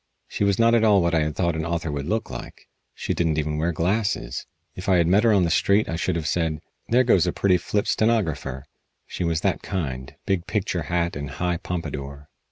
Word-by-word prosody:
She - - -2
was 100 -1 +2
not 115 0 +4
at 115 -1 +4
all 105 -3 +5
what 85 -1 +1
I 80 - +4
had 75 -1 -1
thought 85 -3 0
an 80 - -2
author 85 -1 -2
would 70 0 -4
look 110 -9 -2
like. - - -9 0.3
She - - -2
didn't 80 -3 0
even 75 0 -1
wear 85 +2 +1
glasses. 90 - -1 0.3
If 90 - -5
I 95 - +5
had 85 - +3
met 95 +6 +4
her 115 - +5
on 100 -3 +4
the 85 - +1
street 100 +5 +3
I 80 - -2
should 90 +1 -1
have 80 -2 -3
said: 80 -1 0 0.3
"There 125 +2 +4
goes 95 -8 +3
a - - +2
pretty 95 0 +2
flip 100 +4 -1
stenographer." 80 - 0 0.4
She - - -5
was 80 -1 0
that - - 0
kind 65 -8 -4
big 95 -2 -1
picture 95 -4 -1
hat 85 0 0
and 70 -1 -5
high 90 +4 -1
pompadour. 75 -5 -6
85 Hz, 225 wpm, -24 LUFS, 80-100 Hz, 0.4 s, all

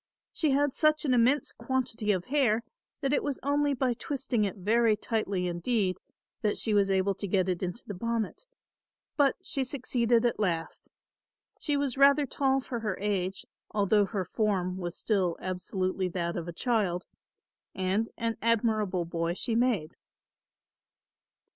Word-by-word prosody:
She 315 - +1
had 280 0 +2
such 305 0 +2
an 260 - +2
immense 250 +4 +3
quantity 240 -5 -1
of 185 -3 -1
hair 250 -5 +2 0.4
that 275 +1 0
it - - +2
was 285 -2 -3
only 285 0 +2
by 255 -1 +1
twisting 260 -3 -1
it 195 - -3
very 220 +3 +3
tightly 200 -6 -1
indeed 185 +2 0 0.4
that 210 -2 +1
she 220 - 0
was 200 -1 +3
able 195 +1 +2
to 200 - -5
get 185 -1 +1
it 180 -2 -1
into 185 +5 -4
the 205 - -5
bonnet; 230 - -3 0.7
but 280 -3 +3
she 275 -7 -2
succeeded 245 -3 +1
at 240 - 0
last. 170 -5 -2 0.7
She 290 -2 0
was 275 -2 -1
rather 280 +1 +6
tall 270 0 +1
for 245 -2 -4
her 210 -4 -2
age, 195 -2 -2 0.2
although 205 0 +3
her 195 -2 -3
form 185 -2 -1
was 175 -1 -4
still 185 -6 0
absolutely 185 0 -2
that 170 -1 -2
of 170 -1 -4
a - - -3
child, 190 -3 0 0.7
and 190 +4 0
an 230 0 -1
admirable 215 -6 +1
boy 170 0 -2
she 230 - -1
made. 225 -9 +1
215 Hz, 155 wpm, -29 LUFS, 185-255 Hz, 0.7 s, rather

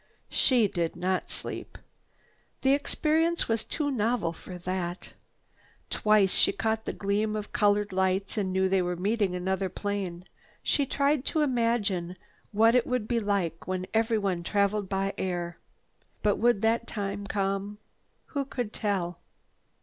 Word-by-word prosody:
She 245 -5 +4
did 170 -3 -2
not 185 +1 -1
sleep. - - -6 0.8
The 270 0 +4
experience 320 +4 +1
was 225 -1 0
too 295 -2 -1
novel 225 -7 0
for 180 +2 -9
that. 180 0 -3 0.8
Twice 210 -3 +4
she - - +4
caught 220 +2 -1
the - - -1
gleam 210 +2 0
of 210 -1 -5
colored 205 -2 +2
lights 190 +1 +1
and 200 -4 -1
knew 190 0 +2
they 190 0 +2
were 180 0 -1
meeting 200 +1 0
another 190 +1 -1
plane. 190 -3 -3 0.4
She 280 -2 +2
tried 280 0 +2
to 315 - +1
imagine 230 -9 0 0.3
what 225 +2 +5
it 250 -1 +3
would 250 -4 -1
be 235 -1 +1
like 200 -6 -1
when 185 0 -2
everyone 220 -5 +1
traveled 200 +2 +1
by 195 0 0
air. 175 -2 -2 0.6
But 205 -1 +3
would 235 -2 +3
that 230 +1 +2
time 200 -1 -4
come? 195 +1 -1 0.6
Who 280 -2 0
could 245 -5 -4
tell? 185 -5 -1
205 Hz, 145 wpm, -28 LUFS, 185-230 Hz, 0.8 s, what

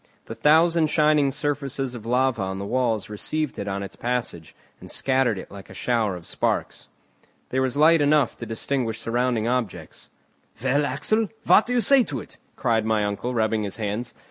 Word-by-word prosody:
The - - -7
thousand 160 +2 +4
shining 150 -2 +3
surfaces 140 -2 -3
of 115 -2 -8
lava 125 -2 +1
on 95 0 -3
the 100 - -5
walls 115 -3 0
received 150 +8 -3
it 100 - -4
on 100 0 -3
its 100 - -8
passage, 115 - -3 0.2
and - - -12
scattered 130 -5 +1
it - - -9
like 100 -1 -11
a - - -11
shower 115 -6 0
of 85 -2 -10
sparks. - - -2 0.6
There 130 - 0
was 130 0 -1
light 160 +1 +5
enough 145 0 +3
to 115 - -6
distinguish 115 0 -2
surrounding 120 -1 0
objects. 120 -5 -3 0.5
"Well, 140 +2 +2
Axel, 215 +11 0 0.2
what 215 - +5
do 245 - -1
you 245 - +3
say 265 +4 +5
to 140 -7 -4
it?" - - -12 0.2
cried 115 -2 +1
my 110 -1 +1
uncle, 105 +5 -3
rubbing 110 -1 +1
his 100 -2 -3
hands. 110 +2 -3
125 Hz, 185 wpm, -24 LUFS, 110-145 Hz, 0.6 s, light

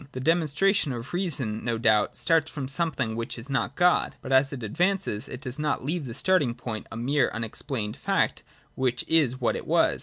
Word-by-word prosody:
The 130 - -4
demonstration 165 +2 +2
of 120 +5 -7
reason 140 - -1
no 115 -1 -1
doubt 110 -2 +2
starts 165 -2 +3
from 140 -4 -5
something 140 -6 -1
which 115 +1 -4
is 120 +4 -6
not 135 - 0
God. 180 0 +3
But, 130 - -6
as 135 +1 +4
it 130 -4 -6
advances, 175 - 0
it 125 - -7
does 130 +2 -5
not 150 -3 -1
leave 160 +1 -2
the 115 - -6
starting 155 -11 +2
point 110 -4 -6
a 110 - -6
mere 130 +2 +2
unex 115 -1 -4
plained 110 -6 -2
fact, - - 0 0.3
which 125 -2 -1
is 145 -6 +3
what 120 - +1
it - - -6
was. - - +3
135 Hz, 205 wpm, -26 LUFS, 115-160 Hz, 0.3 s, as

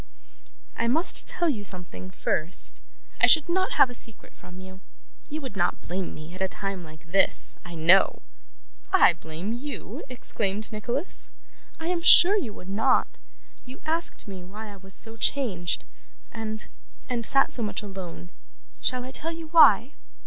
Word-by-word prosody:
'I 230 - 0
must 320 +10 +3
tell 345 - 0
you 235 -10 -2
something, 175 - -8
first. 160 - +1 0.4
I - - +6
should 320 -2 +6
not 375 +2 0
have - - +5
a 245 - -10
secret 230 -3 -1
from 180 0 -14
you. 185 0 -12 0.5
You 310 +1 -5
would 260 -7 -8
not 175 -2 0
blame 180 +1 -4
me, 155 +2 -11
at 185 - -10
a 190 - +1
time 195 -1 -5
like 155 0 -15
this, 195 - +1
I 175 -1 -10
know.' 170 +4 +4 0.7
'I 375 - +6
blame 165 +7 -5
you!' 275 +5 -7
exclaimed 215 -4 -4
Nicholas. 240 - -3 0.5
'I 325 - -5
am 355 -2 -1
sure 360 +3 +8
you 330 - -2
would 180 - -13
not. 200 +3 0 0.4
You 255 +1 -12
asked 325 -6 -2
me 190 -3 -8
why 210 +4 -10
I - - -13
was 190 0 0
so 225 0 0
changed, 205 -9 -1 0.5
and 220 -1 -6 0.4
and 240 -2 -3
sat 275 +4 +6
so 245 - -1
much 215 -1 -3
alone. 185 -3 -9 0.5
Shall 255 -1 0
I 260 - -8
tell 325 +4 -1
you 325 -1 -9
why? 285 -6 +6
215 Hz, 165 wpm, -25 LUFS, 185-270 Hz, 0.7 s, sure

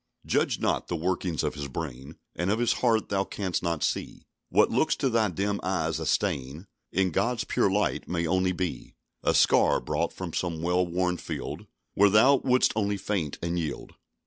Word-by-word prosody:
"Judge - - +1
not; - - 0
the 85 - -2
workings 85 -1 -1
of - - -1
his 70 -1 -5
brain 70 0 -7 0.2
And 85 +3 -1
of 105 - +2
his 120 0 +2
heart 115 -3 +2
thou 95 -1 +1
canst 95 -2 -3
not 85 -3 -1
see: - - -3 0.2
What - - +4
looks - - +2
to 135 - 0
thy 110 -2 +2
dim 100 +3 -1
eyes 95 +1 -1
a - - -3
stain, 70 +6 -1 0.3
In 95 0 +1
God's 115 +6 0
pure 100 - +1
light 105 +2 0
may 85 -1 -1
only 95 +2 +1
be 90 -8 -4 0.3
A - - +1
scar, - - +4
brought - - -1
from 90 -4 -7
some 85 -3 -2
well 90 +1 +2
won 90 +1 0
field, - - -6 0.3
Where 100 +1 +5
thou 120 +7 +6
wouldst 125 -1 +2
only 100 -2 0
faint 95 -8 -2
and 85 +1 -1
yield." 80 -4 -5
90 Hz, 190 wpm, -27 LUFS, 85-100 Hz, 0.3 s, thou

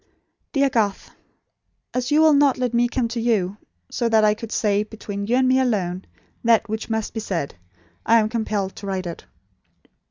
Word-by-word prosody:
"DEAR 280 -2 +3
GARTH, 210 -5 -1 0.8
As 250 0 -1
you 300 +1 +4
will 315 -1 +6
not 280 -1 +4
let 250 -2 -1
me 240 +1 +3
come 240 0 -1
to 235 +1 -3
you, 205 -5 0 0.3
so 235 - 0
that 220 -1 +4
I 210 0 +5
could 225 +1 -8
say, 205 -2 +1
between 210 -2 -6
you 240 - +2
and 260 0 +3
me 260 +1 +4
alone, 195 -8 -1 0.4
that 230 -3 +3
which 220 +1 -4
must 220 -1 -2
be 225 - -3
said, 180 -9 -3 0.5
I 230 - +5
am 215 -2 +3
compelled 215 -4 -2
to 200 - -7
write 190 -1 -2
it. 170 -1 -7
220 Hz, 190 wpm, -22 LUFS, 205-245 Hz, 0.8 s, will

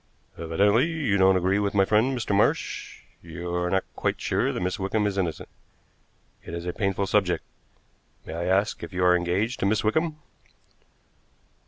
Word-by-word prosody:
"Evidently 100 - +2
you 155 -11 -1
don't 95 0 +5
agree 95 +2 +1
with 100 0 -1
my 95 -1 +4
friend, 115 +6 +2
Mr. 110 -4 -1
Marsh. 100 - -1 0.2
You 85 +1 -6
are 90 0 0
not 95 +1 +1
quite - - -1
sure - - 0
that - - -4
Miss 90 +2 -2
Wickham 105 +2 0
is 100 -1 -1
innocent. 90 -5 -2 1.0
It - - -7
is 85 0 -6
a 90 - -3
painful 100 -2 -1
subject. 95 -4 +1 0.8
May - - -7
I 85 +1 -3
ask 100 +3 +1
if - - -8
you 90 0 -1
are 90 0 +6
engaged 90 +7 -1
to 100 - +1
Miss 110 +1 +1
Wickham?" 155 +8 0
95 Hz, 175 wpm, -25 LUFS, 90-105 Hz, 1.0 s, are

